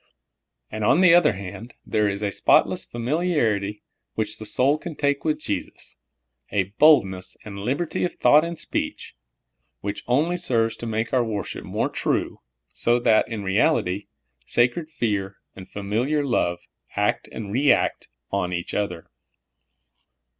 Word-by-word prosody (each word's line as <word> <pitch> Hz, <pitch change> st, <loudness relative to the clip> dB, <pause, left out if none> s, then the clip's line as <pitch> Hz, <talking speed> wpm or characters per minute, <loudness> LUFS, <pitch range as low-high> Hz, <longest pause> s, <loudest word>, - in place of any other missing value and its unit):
And, 110 Hz, -, -4 dB
on 145 Hz, -, +4 dB
the 180 Hz, -3 st, +7 dB
other 170 Hz, -8 st, +5 dB
hand, 100 Hz, +5 st, -8 dB
there 105 Hz, -1 st, +1 dB
is 100 Hz, +1 st, -4 dB
a 100 Hz, -, 0 dB
spotless -, -, +3 dB
familiar 130 Hz, -, 0 dB
ity 100 Hz, +1 st, -6 dB, 0.3 s
which 110 Hz, -1 st, -2 dB
the 110 Hz, -, -3 dB
soul 140 Hz, +7 st, +2 dB
can 170 Hz, -1 st, -7 dB
take 140 Hz, -1 st, 0 dB
with 155 Hz, -1 st, +1 dB
Jesus 100 Hz, -, -5 dB, 0.3 s
— 60 Hz, -1 st, -49 dB
a 100 Hz, -1 st, -1 dB
boldness 95 Hz, -12 st, +4 dB
and 100 Hz, -2 st, -7 dB
libert}^ 140 Hz, +11 st, -2 dB
of 180 Hz, -, -2 dB
thought 150 Hz, +1 st, +5 dB
and 170 Hz, 0 st, -4 dB
speech -, -, -4 dB, 0.3 s
— -, -, -50 dB
which 100 Hz, 0 st, -4 dB
only 155 Hz, +8 st, +2 dB
ser^ 125 Hz, -10 st, +1 dB
es 115 Hz, -, -4 dB
to 120 Hz, -, -6 dB
make 110 Hz, +1 st, -2 dB
our 125 Hz, -2 st, +3 dB
worship 110 Hz, -3 st, -4 dB
more -, -, -1 dB
true, -, -, -1 dB, 0.3 s
so 120 Hz, +1 st, +1 dB
that, 115 Hz, -2 st, +3 dB
in 110 Hz, -3 st, -5 dB
realit}', 95 Hz, 0 st, +1 dB, 0.4 s
sacred 125 Hz, -, +1 dB
fear 105 Hz, -9 st, -2 dB, 0.2 s
and 95 Hz, -1 st, -11 dB
familiar 120 Hz, +9 st, -1 dB
love 90 Hz, -9 st, 0 dB, 0.3 s
act -, -, 0 dB
and 100 Hz, -3 st, -6 dB
react 135 Hz, +6 st, +2 dB, 0.2 s
on 95 Hz, -2 st, -1 dB
each 85 Hz, 0 st, -4 dB
other. 90 Hz, -5 st, -2 dB
110 Hz, 155 wpm, -24 LUFS, 100-145 Hz, 0.4 s, the